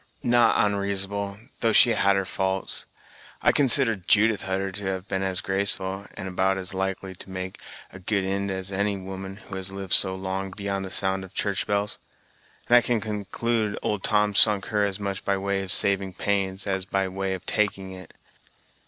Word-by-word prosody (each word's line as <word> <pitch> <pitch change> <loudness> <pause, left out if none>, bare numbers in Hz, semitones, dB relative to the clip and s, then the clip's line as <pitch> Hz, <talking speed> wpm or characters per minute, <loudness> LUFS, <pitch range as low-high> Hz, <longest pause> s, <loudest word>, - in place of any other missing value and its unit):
"Not 120 -1 +4
onreasonable; 100 0 0 0.2
though 115 -2 +1
she 120 - +7
had 100 -3 +3
her 95 0 0
faults. 95 +1 -2 0.6
I - - +5
consider 135 -3 +4
Judith 105 +3 +3
Hutter 95 0 -2
to 100 +1 -7
have 95 0 -3
been 95 -2 -2
as 95 -2 +2
graceful, 95 0 +2
and 95 - -6
about 95 +1 +1
as 95 0 -4
likely 95 0 -3
to 95 - -10
make 95 0 -6 0.3
a 95 - -11
good 100 +1 -1
ind 100 +1 -2
as 95 0 -3
any 100 +1 0
woman 95 0 -7
who 100 -2 -9
had 95 0 -4
lived 95 -1 -5
so 95 -1 +4
long 95 0 -4
beyond 100 -1 -3
the - - -6
sound 95 0 +3
of 95 0 -13
church 100 -2 0
bells; 100 0 -1 0.7
and 120 - +7
I - - +6
conclude 110 0 -1
old 105 -3 -2
Tom 105 -1 +2
sunk 100 -1 +4
her 105 -2 +1
as 100 0 -3
much 100 -1 -4
by 100 -1 0
way 100 0 -1
of 95 -1 -4
saving 95 -1 +2
pains, 95 -1 -1
as 95 -2 -1
by 95 0 -1
way 95 0 -3
of 95 - -11
taking 100 -3 -1
it. 95 -2 -12
95 Hz, 190 wpm, -25 LUFS, 95-100 Hz, 0.7 s, she